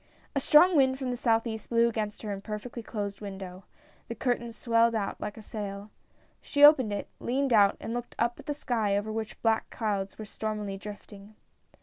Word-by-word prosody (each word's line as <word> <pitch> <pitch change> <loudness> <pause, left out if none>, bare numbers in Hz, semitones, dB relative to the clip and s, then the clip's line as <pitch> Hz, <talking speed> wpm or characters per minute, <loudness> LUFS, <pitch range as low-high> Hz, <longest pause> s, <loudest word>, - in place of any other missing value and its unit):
A - - +3
strong 335 +6 +6
wind 265 -2 +4
from 260 -2 -3
the - - -1
southeast 225 -2 0
blew 235 0 +4
against 215 -2 -3
her 210 - -3
imperfectly 210 +4 -6
closed 205 -3 -5
window; 190 -2 -8 0.4
the 230 - -5
curtains 235 -1 -2
swelled 230 0 +2
out 200 -3 -3
like 210 - -5
a 220 - -10
sail. 205 -1 -6 0.5
She 285 - +1
opened 275 -7 +8
it, 205 - -3
leaned 265 +1 0
out 200 -2 +5
and 225 - -5
looked 240 0 -5
up 235 +1 0
at - - -12
the 295 - 0
sky, 220 -7 0
over 210 +2 -3
which 220 0 -5
black 225 -1 +2
clouds 200 -4 -2
were 215 - -7
stormily 210 -1 -4
drifting. 205 +1 -10
220 Hz, 190 wpm, -28 LUFS, 205-240 Hz, 0.5 s, opened